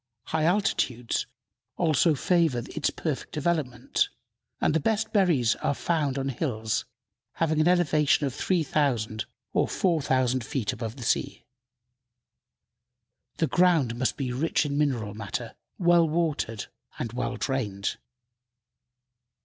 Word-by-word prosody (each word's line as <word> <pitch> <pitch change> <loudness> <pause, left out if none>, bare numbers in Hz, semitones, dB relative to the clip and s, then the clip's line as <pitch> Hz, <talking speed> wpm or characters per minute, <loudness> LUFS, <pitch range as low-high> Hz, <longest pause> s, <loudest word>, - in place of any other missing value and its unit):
High 160 +3 -1
altitudes 135 - +1 0.5
also 160 -1 +3
favor 160 -5 +2
its 155 - +1
perfect 155 -5 -4
development, 150 -5 0 0.5
and - - +2
the 160 - +3
best 220 +5 0
berries 165 - +3
are 140 - -1
found 150 -5 0
on 135 0 -1
hills 115 -5 -2 0.5
having 155 -1 +1
an 155 - +3
elevation 155 -5 +3
of 135 - -2
3,000 135 - 0 0.3
or - - +2
4,000 130 -8 +1
feet 125 -2 -2
above 115 -2 -5
the 130 - -8
sea. 115 - -1 1.9
The - - +2
ground 170 -9 +3
must 125 +1 -1
be 130 -3 -2
rich 155 +4 +1
in 140 -1 -2
mineral 130 -9 0
matter, 115 +1 -5 0.2
well 175 -2 +4
watered 150 - -1 0.3
and 115 - -4
well 125 0 -2
drained. 105 -8 -2
140 Hz, 120 wpm, -27 LUFS, 120-165 Hz, 1.9 s, well